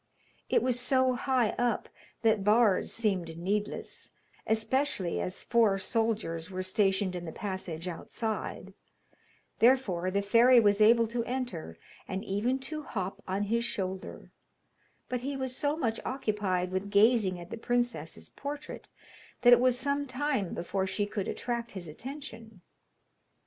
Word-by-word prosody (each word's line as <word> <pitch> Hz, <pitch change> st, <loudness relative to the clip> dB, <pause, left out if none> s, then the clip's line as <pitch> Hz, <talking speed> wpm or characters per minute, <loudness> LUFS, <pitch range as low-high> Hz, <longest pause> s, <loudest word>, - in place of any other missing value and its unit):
It -, -, +3 dB
was 250 Hz, -1 st, +1 dB
so 260 Hz, 0 st, +3 dB
high 250 Hz, -2 st, +1 dB
up 240 Hz, -2 st, 0 dB, 0.4 s
that 220 Hz, -3 st, +3 dB
bars 210 Hz, -1 st, +4 dB
seemed 185 Hz, -7 st, -1 dB
needless, 205 Hz, +4 st, -3 dB, 0.4 s
especially 220 Hz, -3 st, 0 dB
as 185 Hz, -, -4 dB
four 225 Hz, -4 st, +3 dB
soldiers 195 Hz, -5 st, -1 dB
were 185 Hz, -1 st, -4 dB
stationed 190 Hz, -1 st, +1 dB
in 175 Hz, -1 st, -5 dB
the 160 Hz, -, -5 dB
passage 185 Hz, -3 st, -5 dB
outside, 215 Hz, +5 st, -4 dB, 0.9 s
therefore 220 Hz, -8 st, +3 dB
the 200 Hz, +2 st, 0 dB
fairy 235 Hz, +5 st, +6 dB
was 205 Hz, -1 st, +3 dB
able 230 Hz, +2 st, +6 dB
to 235 Hz, 0 st, -1 dB
enter, 240 Hz, -, -4 dB, 0.3 s
and 195 Hz, +2 st, -4 dB
even 215 Hz, +7 st, 0 dB
to 305 Hz, +3 st, -5 dB
hop 195 Hz, -9 st, -4 dB
on 190 Hz, +2 st, -1 dB
his 230 Hz, +3 st, 0 dB
shoulder, 190 Hz, -5 st, -4 dB, 0.8 s
but 250 Hz, -1 st, -2 dB
he 275 Hz, +2 st, -3 dB
was 260 Hz, -1 st, -3 dB
so 290 Hz, +3 st, 0 dB
much 230 Hz, -7 st, -1 dB
occupied 205 Hz, -8 st, -1 dB
with 190 Hz, +2 st, -2 dB
gazing 205 Hz, -3 st, +4 dB
at 175 Hz, 0 st, -11 dB
the -, -, -3 dB
princess's 240 Hz, +1 st, -2 dB
portrait 290 Hz, +1 st, -7 dB, 0.6 s
that 245 Hz, 0 st, +9 dB
it 240 Hz, -, +7 dB
was 250 Hz, 0 st, +3 dB
some 280 Hz, +2 st, -1 dB
time 255 Hz, -, -1 dB
before 190 Hz, +2 st, -2 dB
she 205 Hz, +2 st, -1 dB
could 205 Hz, -1 st, -4 dB
attract 235 Hz, -1 st, -3 dB
his 185 Hz, -4 st, -7 dB
attention. 225 Hz, -, -9 dB
220 Hz, 145 wpm, -30 LUFS, 190-245 Hz, 0.9 s, that